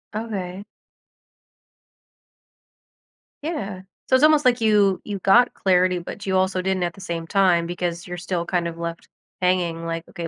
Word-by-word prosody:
Okay. 200 -4 -4 2.8
Yeah. 205 - -4 0.3
So 260 - +5
it's 260 - +3
almost 305 -1 +6
like 250 -1 +4
you 205 -4 +3
you 205 -2 -4
got 235 +7 +4
clarity, 185 -2 +2
but 200 +4 -8
you 190 -1 0
also 185 0 +1
didn't 190 -1 -1
at 175 -1 -2
the 195 - -14
same 170 -3 -4
time 180 -4 +3
because 175 -1 -4
you're 180 0 -6
still 175 -1 -3
kind 175 -1 -1
of 165 0 -6
left 170 0 -6 0.3
hanging 175 -2 0
like, 165 0 -4
"Okay, 170 -1 -6
185 Hz, 160 wpm, -23 LUFS, 170-200 Hz, 2.8 s, almost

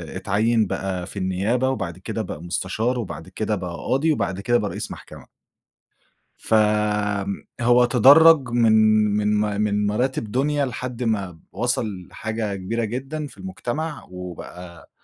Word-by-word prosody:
اتعيّن 105 +3 +1
بقى 90 -2 -3
في 100 - -9
النيابة، 100 +8 0
وبعد 135 - -3
كده - - -4
بقى 80 - -6
مُستشار، 110 +8 -1
وبعد 80 -6 -6
كده 110 +2 -2
بقى 90 -3 -5
قاضي، 150 +5 0
وبعد 100 -8 -1
كده 120 +3 +2
بقى 105 -3 -2
رئيس - - -5
محكمة. - - -11 1.1
ف 110 - -1 1.1
هو 120 +1 +5
تدرّج 135 +4 +7
من 115 -2 +3 0.4
من 105 0 +1
ما 105 -1 0
من 105 -1 +1
مراتب 115 0 -1
دنيا 145 +1 +1
لحد 125 0 -5
ما 100 -7 -1
وصل 105 -4 -2
لحاجة 110 -2 -4
كبيرة 115 +5 -2
جدًا 135 +7 -4
في - - -14
المجتمع، 160 -4 -4
وبقى 90 -1 -9
110 Hz, 140 wpm, -23 LUFS, 95-125 Hz, 1.1 s, تدرّج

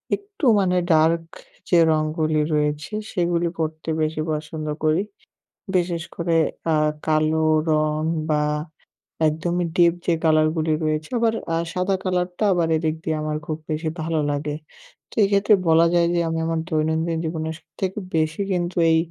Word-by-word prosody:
একটু 400 -6 -7
মানে 180 -2 +2
ডার্ক 165 +1 +4 0.5
যে 175 - +5
রঙগুলি 155 0 0
রয়েছে 150 +5 -1 0.2
সেগুলি 175 -2 0
পরতে 160 0 -3
বেশি 155 0 -1
পছন্দ 155 0 -4 0.2
করি। 155 +3 +3 0.7
বিশেষ 175 -2 0
করে 170 -1 0 0.4
আ - - +3 0.3
কালো 155 0 +2 0.3
রঙ 155 0 +1 0.3
বা 150 0 +2 0.9
একদমই 170 +3 -1
ডিপ 170 -2 +5
যে 175 - +3
কালারগুলি 155 0 +2
রয়েছে 155 0 -1
আবার 230 -1 +2 0.2
আ - - +1 0.2
সাদা 185 +2 0
কালারটা 180 +1 -1
আবার 170 -2 +1
এদিক 155 0 -1
দিয়ে 160 - -1
আমার 150 0 -2
খুব 155 0 -3
বেশি 155 +1 -1
ভালো 160 0 -1
লাগে, 145 +1 -2 0.5
তো - - -15
এক্ষেত্রে 200 +1 +3
বলা 165 +1 +5
যায় 170 -1 +4
যে 175 - +1
আমি 165 - -1
আমার 165 0 -1
দৈনন্দিন 160 +1 0
জীবনের 160 0 -3
সবথেকে 190 +5 -5 0.2
বেশি 160 +4 0
কিন্তু 175 -1 -1
এই 160 - +5
160 Hz, 150 wpm, -22 LUFS, 155-175 Hz, 0.9 s, যে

